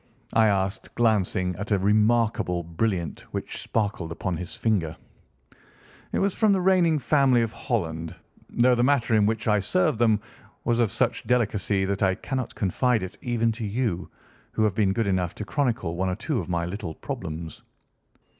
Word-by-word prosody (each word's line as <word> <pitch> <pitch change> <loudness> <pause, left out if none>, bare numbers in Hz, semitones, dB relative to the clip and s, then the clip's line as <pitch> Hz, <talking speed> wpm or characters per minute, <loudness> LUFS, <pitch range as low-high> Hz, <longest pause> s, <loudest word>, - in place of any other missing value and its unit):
I 110 -1 +5
asked, 100 0 -1
glancing 95 -5 +2
at 100 +2 -5
a 105 - +3
remarkable 105 -3 +2
brilliant 85 -1 -2
which - - -4
sparkled 100 -6 -2
upon 90 +1 -3
his 90 +2 -6
finger. 90 -8 0 1.1
"It - - -1
was 195 -1 +1
from 215 -3 +3
the 190 - +2
reigning 180 -4 +4
family 135 -3 +3
of 115 - -2
Holland, 85 - -3 0.3
though 125 +1 +3
the 120 - +2
matter 125 -4 +2
in 105 -1 +4
which 110 +1 -1
I 105 -1 +4
served 95 +2 +1
them 110 -3 +4 0.4
was 120 0 +1
of 115 -4 +2
such - - 0
delicacy 105 -5 +1
that 100 0 -2
I 95 -1 +3
cannot 130 +1 -4
confide 115 +3 +1
it 95 - -6
even 115 -2 +1
to 115 +1 -6
you, 105 -4 -2 0.4
who 110 - +1
have 105 -3 +2
been 100 -1 +2
good 115 +3 0
enough 90 -3 0
to 105 - -5
chronicle 120 - -1
one 95 +2 0
or 90 - -1
two 120 - -2
of - - -6
my 85 -1 0
little 90 -3 -5
problems." 80 0 -6
105 Hz, 175 wpm, -25 LUFS, 95-120 Hz, 1.1 s, I